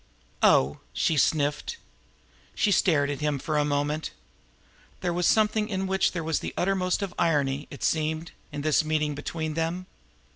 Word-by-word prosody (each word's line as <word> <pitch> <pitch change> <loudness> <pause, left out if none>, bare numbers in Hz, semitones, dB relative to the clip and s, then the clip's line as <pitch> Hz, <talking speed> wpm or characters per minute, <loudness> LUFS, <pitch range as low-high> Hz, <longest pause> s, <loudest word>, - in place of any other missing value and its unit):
"Oh!" 65 +2 +4
she 160 - +1
sniffed. 145 0 +1 0.8
She 205 - +2
stared 145 -7 +3
at 145 - -5
him 150 -1 0
for 155 +3 -3
a - - +3
moment. 145 +1 -1 0.9
There 175 -1 0
was 175 0 +1
something 215 0 +2
in 190 -2 -1
which 190 0 +2
there 170 -2 -3
was 160 -1 0
the - - -6
uttermost 185 +1 +1
of 190 -3 -4
irony 145 -4 +1
now, - - -8
it - - -9
seemed, 160 +1 0 0.2
in 145 -1 -4
this 155 +1 +3
meeting 155 -1 0
between 155 +2 -4
them. 165 +3 -2
155 Hz, 170 wpm, -27 LUFS, 145-180 Hz, 0.9 s, Oh